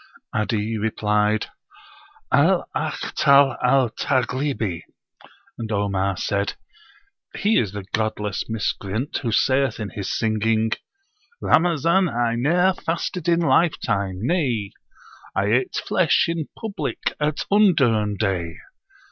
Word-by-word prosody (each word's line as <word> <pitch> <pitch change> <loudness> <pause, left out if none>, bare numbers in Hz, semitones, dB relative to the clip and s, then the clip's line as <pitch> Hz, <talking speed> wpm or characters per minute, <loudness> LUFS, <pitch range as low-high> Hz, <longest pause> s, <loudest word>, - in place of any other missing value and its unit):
'Adi 110 0 -1
replied, 105 0 +1 0.9
"Al - - +3
Akhtal 140 -2 +3
al 130 -4 +3
Taghlibi." 130 - -1 0.8
And 115 -1 -5
Omar 100 -2 0
said, 100 0 -1 0.8
"He 215 +2 +2
is 105 -5 -1
the 100 -2 -6
[godless] 110 -2 -2
miscreant 110 +3 -2
who 120 -5 -2
saith 130 0 +2
in 105 -2 -5
his 100 - -4
singing: 110 0 +1 0.7
'Ramazan 170 +2 +3
I 120 -2 0
ne'er 175 +10 +2
fasted 175 0 -3
in 170 0 +3
lifetime; 100 - +1
nay 125 - 0 0.6
I 100 +1 +1
ate 125 +1 +1
flesh 180 -4 +3
in 165 -2 -2
public 215 -4 -3
at 150 0 -1
undurn 130 - +3
day! 90 -5 -1
115 Hz, 105 wpm, -22 LUFS, 105-150 Hz, 0.9 s, Al